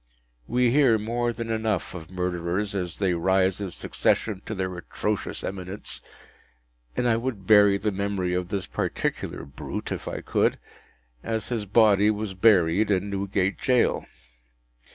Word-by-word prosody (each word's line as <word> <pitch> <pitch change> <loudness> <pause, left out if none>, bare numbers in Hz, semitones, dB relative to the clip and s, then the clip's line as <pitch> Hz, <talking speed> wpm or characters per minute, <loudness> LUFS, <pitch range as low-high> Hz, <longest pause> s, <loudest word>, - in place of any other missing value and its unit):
We 125 0 +2
hear 130 -4 +5
more 120 +3 -1
than 115 -1 -5
enough 110 -3 -1
of 85 -2 -8
murderers 90 +2 -2
as 90 -3 -3
they 95 -3 +1
rise 95 +2 +2
in 100 - -3
succession 95 +3 0
to 110 - -3
their 95 -1 -3
atrocious 105 +4 -3
eminence, 95 +1 -5 1.0
and 125 - +1
I 115 -1 +3
would 115 -5 -4
bury 100 -1 +6
the 105 +2 -1
memory 100 -2 -1
of 90 -1 -2
this 100 -2 -2
particular 65 - -3
brute, 70 - -6
if - - -4
I - - -4
could, - - +1 0.6
as 110 -1 -3
his 115 -4 -2
body 105 0 +5
was 105 -2 -2
buried, 95 -1 +4
in 100 0 +1
Newgate 100 0 -1
Jail. 125 -3 +2
100 Hz, 150 wpm, -26 LUFS, 95-110 Hz, 1.0 s, bury